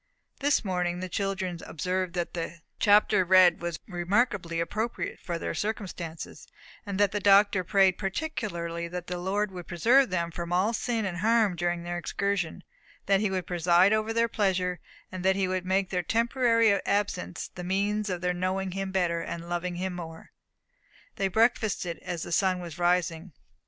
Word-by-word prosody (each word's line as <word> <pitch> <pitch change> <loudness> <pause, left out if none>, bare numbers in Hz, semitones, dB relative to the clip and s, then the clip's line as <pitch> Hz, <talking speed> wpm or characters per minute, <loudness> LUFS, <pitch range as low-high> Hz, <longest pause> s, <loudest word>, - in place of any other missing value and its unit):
This 285 -4 +2
morning 180 -2 -1
the 185 - -4
children 190 -2 -2
observed 180 +2 -2
that 175 -1 -2
the 170 0 -5 0.2
chapter 205 -2 +5
read 185 -1 +5
was 170 -1 -3
remarkably 180 -1 0
appropriate 215 +7 -3
to 170 -2 -1
their - - -3
circumstances, 185 -6 -5 0.4
and 200 -1 -3
that 205 -2 +4
the 205 - -1
Doctor 200 -1 +5
prayed 190 0 +3
particularly 185 - -3
that 180 0 -6
the 180 0 -4
Lord 200 +3 -1
would 180 -2 -8
preserve 240 +10 +4
them 170 -2 -1
from 170 +1 -5
all 190 +6 +2
sin 230 -1 -1
and 180 -3 -3
harm 215 -1 +3
during 175 0 -1
their 175 0 -3
excursion; 185 -1 -2 0.4
that 195 0 +3
he 210 0 +1
would 185 -2 -2
preside 175 +3 +4
over 215 +1 0
their 230 +1 +2
pleasures, 185 -5 0 0.3
and 185 -1 -6
that 190 0 +3
he 195 -1 +1
would 185 0 -2
make 190 0 +1
their 180 -1 0
temporary 230 +2 +3
absence 200 - -2
the 180 - -7
means 205 +3 0
of 180 -2 -3
their 180 0 0
knowing 185 +1 -2
him 195 +1 -3
better, 175 -3 0
and 170 0 -6
loving 175 +1 -2
him 185 +1 -3
more. 165 -2 -9 0.9
They 195 - +1
breakfasted 215 -4 +1
as 175 -3 -5
the - - -7
sun 185 +1 +2
was 170 -1 -8
rising. 175 -1 0
185 Hz, 170 wpm, -28 LUFS, 175-205 Hz, 0.9 s, chapter